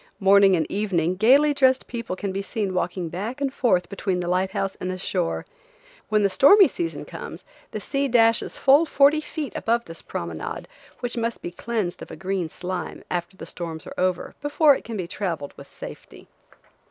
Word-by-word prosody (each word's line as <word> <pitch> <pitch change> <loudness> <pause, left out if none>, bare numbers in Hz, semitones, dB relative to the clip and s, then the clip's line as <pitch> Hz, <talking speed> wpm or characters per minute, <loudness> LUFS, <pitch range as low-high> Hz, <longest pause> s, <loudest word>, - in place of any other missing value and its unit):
Morning 195 -1 +6
and 160 -3 +1
evening 185 -4 0
gaily 270 +9 +5
dressed 260 -2 +3
people 230 -6 -5
can 195 +1 -4
be 195 +1 -2
seen 200 -2 -3
walking 180 -1 -2
back 210 - -5
and 275 -2 -1
forth 185 -11 +2
between 195 -2 -2
the 175 - -3
light 185 +2 +1
house 195 0 -2
and 185 - -4
the 185 - -3
shore. 180 -2 -2 0.6
When 215 -1 +3
the - - +5
stormy 375 - +7
season 340 -1 -4
comes - - -8 0.3
the - - -5
sea 280 0 -1
dashes 230 -2 +3
full 285 +5 +5
forty 290 +2 +4
feet 305 -2 -5
above 235 +1 0
this 165 0 -10
promenade, 85 -2 -5 0.3
which 245 -1 -3
must 230 0 -2
be 175 - -4
cleansed 190 -1 -3
of - - -8
a - - -8
green 190 -3 -2
slime, 180 0 -5
after 175 +1 -3
the - - -8
storms 165 -2 -7
are - - -8
over, 180 -1 -1
before 290 0 +4
it - - -7
can 230 -2 -6
be 180 -3 -3
traveled 170 -7 -4
with - - -13
safety. - - -11
195 Hz, 190 wpm, -24 LUFS, 180-245 Hz, 0.6 s, stormy